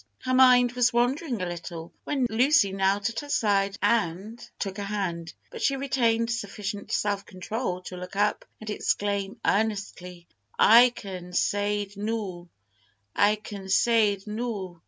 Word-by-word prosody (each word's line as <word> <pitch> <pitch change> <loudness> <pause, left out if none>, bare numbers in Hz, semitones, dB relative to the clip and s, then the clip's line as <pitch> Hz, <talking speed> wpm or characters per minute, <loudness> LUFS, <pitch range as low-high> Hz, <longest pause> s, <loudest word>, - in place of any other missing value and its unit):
Her 255 - -2
mind 250 -1 +6
was 245 -1 +2
wandering 245 - 0
a - - -1
little 170 -1 -7
when 270 -3 0
Lucy 230 -2 +3
knelt 195 +2 +1
at 230 - -4
her 290 - -9
side 200 -5 +1
and 215 +1 0 0.2
took 195 -1 -4
her 205 - -4
hand, 185 -5 -3 0.2
but 465 -2 -8
she 275 - +2
retained 235 -4 +1
sufficient 205 -2 -5
self 205 -1 0
control 185 0 -4
to 180 - -8
look 180 +2 -8
up 205 +1 +1 0.2
and 215 -1 -6
exclaim 205 +1 -2
earnestly, 195 -4 -2 0.3
"I 240 +3 +7
can 185 -6 -9
say'd 205 +1 -1
noo 200 -5 -4 0.7
I 205 +1 +4
can 200 -2 -9
say'd 205 -2 +3
noo! 210 -5 -5
205 Hz, 145 wpm, -26 LUFS, 195-235 Hz, 0.7 s, I